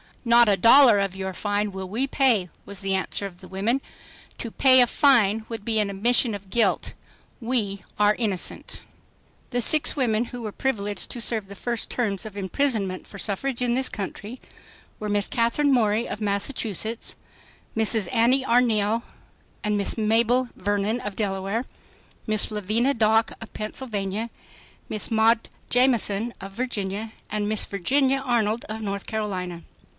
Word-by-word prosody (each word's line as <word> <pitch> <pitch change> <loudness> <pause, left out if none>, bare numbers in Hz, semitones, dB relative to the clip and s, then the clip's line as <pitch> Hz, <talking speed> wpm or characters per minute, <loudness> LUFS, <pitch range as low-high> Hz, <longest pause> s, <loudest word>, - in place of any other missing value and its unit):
"Not 235 -1 +6
a 200 - +3
dollar 235 +1 +7
of 195 -1 -1
your 190 0 -4
fine 205 +2 -1
will 190 0 -6
we 235 +7 0
pay," 250 -10 +2
was 200 -2 -8
the 195 0 -1
answer 190 +1 -1
of 180 -3 -9
the 185 - -12
women. 215 +8 -1 0.6
"To 230 - -4
pay 260 +1 +6
a 245 - +5
fine 225 -7 +3
would 225 -3 -6
be 225 -1 +1
an 210 -1 +1
admission 225 +3 +2
of 195 -1 -11
guilt. 235 +2 +1 0.5
We 225 -5 -1 0.2
are 210 0 +5
innocent." 205 -7 -3 0.7
The 245 -1 -1
six 305 +6 +3
women 235 -4 +1
who 245 0 -8
were 215 - -4
privileged 205 -5 -2
to 240 - -2
serve 220 -3 -1
the 200 - -10
first 235 +3 -3
terms 205 -6 -2
of 210 -2 -8
imprisonment 200 -2 -1
for 200 - -11
suffrage 235 +6 -2
in 240 -1 +1
this 260 +1 +1
country, 210 +4 -6 0.6
were 210 - -4
Miss 205 -1 +1
Katherine 270 +3 +1
Morey 225 -2 +2
of 210 - -6
Massachusetts, 215 +1 -2 0.6
Mrs. 220 -1 +4
Annie 250 +3 +3
Arneil 230 -2 +2 0.6
and 210 0 0
Miss 200 +3 -1
Mabel 230 +3 +2
Vernon 205 +4 -1
of 205 -1 -5
Delaware, 200 +3 -2 0.6
Miss 215 -1 +2
Lavinia 215 +6 +1
Dock 220 0 +2
of 225 - -11
Pennsylvania, 215 -1 -4 0.6
Miss 215 - +1
Maud 225 +1 +3 0.2
Jamison 240 -3 +3
of 195 +1 -8
Virginia, 215 -2 -3 0.2
and 210 -1 -1
Miss 215 -1 +1
Virginia 265 +8 +1
Arnold 235 -4 0
of 220 +1 -6
North 200 -2 -4
Carolina. 185 -6 -4
215 Hz, 155 wpm, -24 LUFS, 200-240 Hz, 0.7 s, dollar